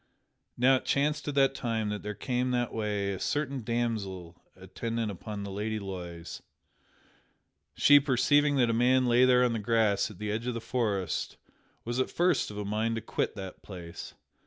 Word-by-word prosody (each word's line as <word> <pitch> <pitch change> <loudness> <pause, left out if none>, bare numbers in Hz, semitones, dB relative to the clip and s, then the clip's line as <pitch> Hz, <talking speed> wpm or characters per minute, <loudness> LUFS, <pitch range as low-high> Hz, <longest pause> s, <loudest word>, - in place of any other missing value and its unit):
Now 130 +2 +5
it - - -8
chanced 150 +2 0
at 145 - -2
that 135 -1 +4
time 115 -5 -2
that 105 0 -3
there 105 0 -5
came 125 +3 -1
that 120 -1 -1
way 105 -2 -1
a 95 - -6
certain 140 -3 -1
damsel 105 -7 -3
attendant 110 +4 -4
upon 100 +2 -6
the 100 - -6
Lady 105 +3 -2
Loise. 90 -4 -7 1.3
She 145 0 +7
perceiving 145 +2 +3
that 120 -4 +3
a - - 0
man 125 +2 +3
lay 120 +1 +5
there 125 -1 +5
on 120 -2 +2
the 115 - -1
grass 105 -2 +2
at 105 - -12
the 105 0 -3
edge 115 +3 -3
of 125 - -1
the - - -2
forest 105 -6 -2 0.5
was 120 +2 -2
at 130 - +1
first 175 0 +1
of 105 - -8
a 105 - -3
mind 110 +3 -1
to 110 - -3
quit 110 - -2
that 95 -2 -8
place. 85 -4 -9
115 Hz, 185 wpm, -29 LUFS, 100-125 Hz, 1.3 s, She